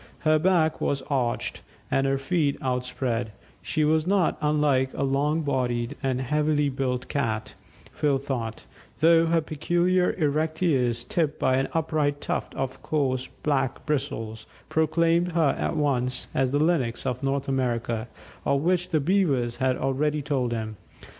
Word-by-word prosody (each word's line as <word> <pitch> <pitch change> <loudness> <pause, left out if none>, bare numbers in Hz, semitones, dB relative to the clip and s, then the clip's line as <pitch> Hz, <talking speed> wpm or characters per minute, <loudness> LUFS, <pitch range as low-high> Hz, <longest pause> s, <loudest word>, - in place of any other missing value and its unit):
Her 155 0 +3
back 160 -2 +2
was 140 -1 0
arched, 125 -4 -1 0.3
and 135 0 +2
her 135 0 +1
feet 145 0 0
outspread; 125 -2 -2 0.3
she 155 - 0
was 155 +2 +2
not 195 -3 +2
unlike 150 -3 +2
a - - -1
long 145 +4 +1
bodied 125 -2 -1
and 130 -2 0
heavily 150 +2 +1
built 130 -2 -2
cat, 110 -6 -2 0.4
Phil 145 -3 +1
thought, 125 -5 -4 0.3
though 165 +1 +5
her 165 0 +3
peculiar 175 +4 +1
erect 155 +1 0
ears, 125 -8 +2
tipped 165 -6 -1
by 130 0 +2
an 135 - +1
upright 150 -3 0
tuft - - -3
of 135 -1 -4
coarse 130 -4 -1 0.2
black 140 -4 0
bristles, 115 -7 -3 0.2
proclaimed 165 +2 +2
her 160 -4 +3
at - - -1
once 130 -4 0
as 135 -1 +1
the 140 - +1
Lynx 145 -7 +1
of 125 0 -2
North 135 0 -1
America, 120 -3 -1 0.4
of 140 +1 +1
which 180 +1 +1
the 160 -3 +2
Beavers 140 -8 +1
had 130 -1 +1
already 145 +3 0
told 135 -4 0
him. 110 -2 -4
140 Hz, 150 wpm, -26 LUFS, 130-155 Hz, 0.4 s, though